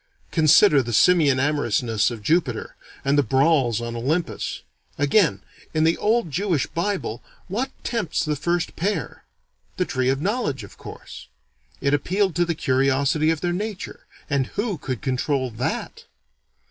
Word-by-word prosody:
Consider 155 -1 +5
the 120 -1 -5
simian 145 - +4
amorousness 120 -7 +1
of 115 -3 -8
Jupiter, 150 - 0 0.3
and 140 +1 +3
the - - +6
brawls 135 -2 +2
on 120 0 -5
Olympus. 150 +9 -2 0.3
Again, 150 +4 +2 0.3
in 155 - +3
the 165 +1 +3
old 220 -5 +1
Jewish 175 -2 0
Bible, 175 - -3 0.3
what 235 +8 -2
tempts 210 -9 -1
the 150 -1 0
first 170 +3 -1
pair? 180 - -3 0.5
The - - +1
Tree 130 0 0
of 135 0 +1
Knowledge, 185 - -1
of 100 - -12
course. - - -11 0.5
It 140 0 +1
appealed 185 +5 +1
to 175 - +3
the 170 -1 -1
curiosity 135 +3 +2
of 160 -2 0
their 175 -1 0
nature, 205 +1 -5 0.2
and 140 -3 0
who 205 -5 -3
could 130 -4 -5
control 130 0 -1
_that! 110 - -4
150 Hz, 145 wpm, -23 LUFS, 130-175 Hz, 0.5 s, the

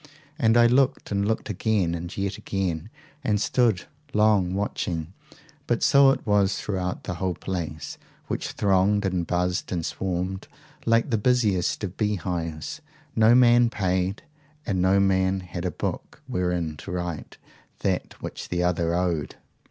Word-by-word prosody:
And 115 -4 +4
I 120 - +7
looked 130 +2 +2
and 100 0 +1
looked 110 - -1
again 100 -3 +1
and 85 +1 -5
yet 100 0 -2
again, 90 -5 -2 0.3
and 105 -1 +1
stood 110 -5 +2 0.3
long 105 -4 +3
watching 90 -4 -3 0.5
but - - +1
so 140 -1 +6
it 135 - 0
was 100 -2 +2
throughout 90 -3 -3
the - - -3
whole 95 -2 0
place, 85 -5 -5 0.3
which - - -3
thronged 100 +1 +2
and 90 -3 -1
buzzed 90 0 -1
and 85 -3 -1
swarmed 95 0 -3 0.4
like 115 +3 +3
the 110 - +2
busiest 105 -6 +1
of 95 -2 -4
bee 105 -1 +1
hives 85 -4 -4 0.3
no 110 +2 +6
man 120 -1 +6
paid, 95 - -1 0.4
and 95 -3 0
no 95 +2 +4
man 95 -1 +2
had 90 -1 -6
a - - +1
book - - -5
wherein 90 -4 -1
to - - -8
write 90 -3 -4 0.4
that - - -2
which - - -6
the 90 0 0
other 85 -1 +1
owed! 85 -6 -1
95 Hz, 150 wpm, -25 LUFS, 90-105 Hz, 0.5 s, I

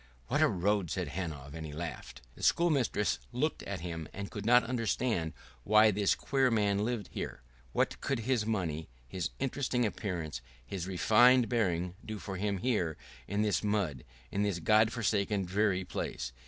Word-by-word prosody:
"What - - +2
a - - +7
road!" 100 0 +1
said 90 -3 -2
Hanov, 75 -5 -5
and 80 0 -6
he 80 - -6
laughed. 80 -5 -6
The - - -14
schoolmistress 140 -11 +2
looked 140 +6 -1
at 100 -4 -5
him 85 -3 -5
and 100 0 -6
could 105 0 -5
not 125 0 +7
understand 115 -7 0 0.3
why 110 +1 +6
this 100 0 +2
queer 135 -2 +1
man 105 -3 +2
lived 115 -4 -2
here. - - -5 0.3
What - - 0
could 135 -4 -1
his 120 -1 +1
money, 85 - -2 0.2
his 90 +3 -3
interesting 130 -2 0
appearance, 85 - -3 0.2
his 90 +4 -4
refined 120 +6 +5
bearing 90 -7 0
do 110 -1 -5
for 100 -1 -6
him 100 +1 -1
here, 90 -8 0 0.3
in 100 +2 0
this 105 -1 +1
mud, 100 - 0 0.3
in 100 - 0
this 100 -3 +1
God 110 +6 +4
forsaken, 100 -3 0
dreary 95 0 +1
place? - - -4
100 Hz, 170 wpm, -32 LUFS, 85-115 Hz, 0.3 s, a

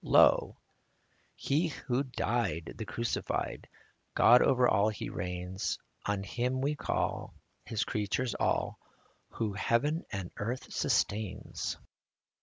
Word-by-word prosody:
Lo! - - +5 0.8
He 155 +5 +1
who 135 -4 -1
died, 120 - -1
the 110 - -3
Crucified, 115 +5 -2 0.5
God 125 +1 +7
over 125 -1 +4
all 100 +1 +4
He 105 - -5
reigns 90 +1 -3 0.3
• - - -2
On 100 -1 -1
Him 125 +5 -1
we 140 +3 +1
call, 150 - -2 0.3
His 110 - -1
creatures 110 +4 -1
all, - - 0 0.5
Who 110 -3 -1
heaven 130 - +1
and 95 -3 -4
earth 120 +5 -4
sustains. 105 -2 -1
115 Hz, 115 wpm, -31 LUFS, 100-125 Hz, 0.8 s, God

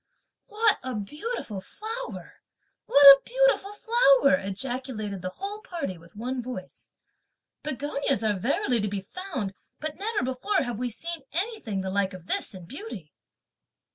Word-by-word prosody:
"What 430 0 +3
a 255 -1 -4
beautiful 220 - -4
flower! 450 - -7 0.5
what 285 0 +6
a 275 0 +12
beautiful - - +2
flower!" 415 - +4
ejaculated 215 -2 -4
the 185 - -3
whole 400 - -6
party 345 - -4
with 170 +5 -18
one 250 +4 -3
voice; 235 -7 -8 0.7
"begonias 280 -4 -1
are 215 -1 +2
verily 235 +3 +1
to 210 - 0
be 200 -1 -3
found; 260 - -5 0.3
but 310 -1 -4
never 415 - -1
before 260 +11 0
have 240 -3 -4
we 250 0 -1
seen 335 +7 -4
anything 350 - -2
the 190 0 -3
like 200 0 +1
of 180 -2 -11
this 195 - -1
in 180 -2 -9
beauty." 225 - -8
260 Hz, 145 wpm, -27 LUFS, -, 0.7 s, a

